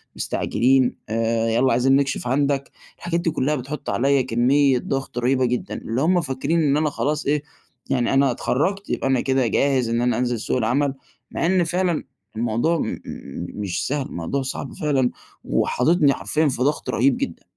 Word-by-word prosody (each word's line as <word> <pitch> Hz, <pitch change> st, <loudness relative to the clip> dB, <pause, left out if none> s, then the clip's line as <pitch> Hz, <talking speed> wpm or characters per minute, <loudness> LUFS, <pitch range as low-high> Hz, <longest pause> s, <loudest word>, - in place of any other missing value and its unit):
مستعجلين، 130 Hz, +2 st, +1 dB
آآ 115 Hz, 0 st, 0 dB
يالّا 120 Hz, +3 st, +2 dB
عايزين 130 Hz, +3 st, +3 dB
نكشف 140 Hz, -3 st, 0 dB
عندك." 140 Hz, +1 st, 0 dB, 0.3 s
الحاجات 170 Hz, 0 st, -2 dB
دي 165 Hz, -2 st, 0 dB
كلَّها 150 Hz, +1 st, 0 dB
بتحُط 140 Hz, +3 st, -5 dB
عليّا 135 Hz, +2 st, +2 dB
كميّة 130 Hz, +2 st, +3 dB
ضغط 135 Hz, -2 st, -4 dB
رهيبة 130 Hz, +1 st, +2 dB
جدًا، 125 Hz, 0 st, -2 dB
اللي 115 Hz, +4 st, -3 dB
هُم 175 Hz, +2 st, +3 dB
فاكرين 145 Hz, +3 st, -1 dB
إن 145 Hz, 0 st, +3 dB
أنا 155 Hz, -1 st, +1 dB
خلاص 150 Hz, +1 st, -2 dB
إيه، 145 Hz, +1 st, +1 dB, 0.5 s
يعني 125 Hz, -1 st, +1 dB
أنا 135 Hz, -1 st, +4 dB
اتخرَّجت، 190 Hz, +12 st, -1 dB
يبقى -, -, -1 dB
أنا 130 Hz, -2 st, +2 dB
كده 130 Hz, -2 st, +1 dB
جاهز 130 Hz, -2 st, +1 dB
إن 115 Hz, +1 st, 0 dB
أنا 120 Hz, -2 st, +1 dB
أنزِل 120 Hz, -2 st, 0 dB
سوق 120 Hz, -, -1 dB
العمل، 135 Hz, +4 st, +1 dB, 0.4 s
مع -, -, -1 dB
إن 180 Hz, 0 st, +3 dB
فعلًا 175 Hz, 0 st, 0 dB, 0.3 s
الموضوع 120 Hz, +9 st, 0 dB
م -, -, -3 dB, 0.6 s
مش 95 Hz, -2 st, -2 dB
سهل، 140 Hz, -1 st, -1 dB
الموضوع 85 Hz, +12 st, -3 dB
صعب 135 Hz, 0 st, -5 dB
فعلًا 140 Hz, -7 st, +1 dB, 0.3 s
وحاططني 145 Hz, +1 st, +2 dB
حرفيًا 155 Hz, 0 st, 0 dB
في 125 Hz, -, -3 dB
ضغط 145 Hz, +2 st, -1 dB
رهيب 130 Hz, +2 st, +2 dB
جدًا. 85 Hz, -, -4 dB
135 Hz, 170 wpm, -22 LUFS, 125-145 Hz, 0.6 s, أنا